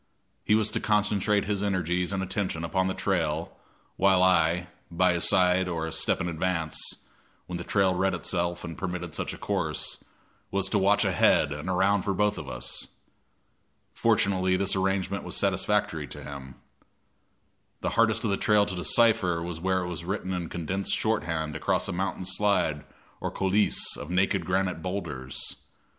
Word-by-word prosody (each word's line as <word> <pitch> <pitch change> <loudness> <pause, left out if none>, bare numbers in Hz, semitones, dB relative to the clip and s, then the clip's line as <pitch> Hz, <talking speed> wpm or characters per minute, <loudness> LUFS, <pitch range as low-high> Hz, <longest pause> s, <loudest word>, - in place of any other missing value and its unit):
He 105 - +3
was 110 -1 +2
to - - +1
concentrate 105 -1 +1
his 100 -1 -1
energies 90 -2 0
and 95 -1 -1
attention 95 -3 -2
upon 95 +3 0
the 95 - -2
trail, 85 -4 -1 0.4
while 95 -1 +4
I, 90 -1 +3 0.2
by 90 +1 +2
his 85 0 +1
side 95 -1 +3
or 85 -2 -2
a 80 - -4
step 80 - +1
in 85 - -2
advance, 80 -1 -1 0.7
when 90 -1 -5
the - - -4
trail 95 0 +2
read 95 +1 +1
itself 85 +1 -2
and 85 -2 -6
permitted 90 -1 -4
such - - -3
a - - -8
course, - - -2 0.5
was 100 -1 0
to 105 - +2
watch 100 +2 +3
ahead 85 -5 +3
and 75 +4 -5
around 95 +2 +2
for 100 +1 -1
both 105 +1 +1
of 75 - -7
us. - - -4 1.1
Fortunately 100 -5 +2
this 100 +1 +1
arrangement 95 +1 -1
was - - -2
satisfactory 100 -4 0
to - - -9
him. 65 -2 -9 1.3
The - - 0
hardest - - +3
of - - 0
the 100 - +1
trail 105 -1 +3
to 95 - -4
decipher 90 -1 +3
was 85 -1 -5
where 95 0 +1
it - - -4
was 85 -2 -5
written 95 +1 -3
in 85 -3 -3
condensed 90 +4 -1
shorthand 80 -8 -1
across 80 - 0
a - - -2
mountain 95 +1 -2
slide 95 -7 +1 0.3
or - - -2
coulisse 95 +2 +1
of 75 - -8
naked 90 -1 +1
granite 90 -3 0
boulders. 85 -9 -4
95 Hz, 170 wpm, -27 LUFS, 85-100 Hz, 1.3 s, while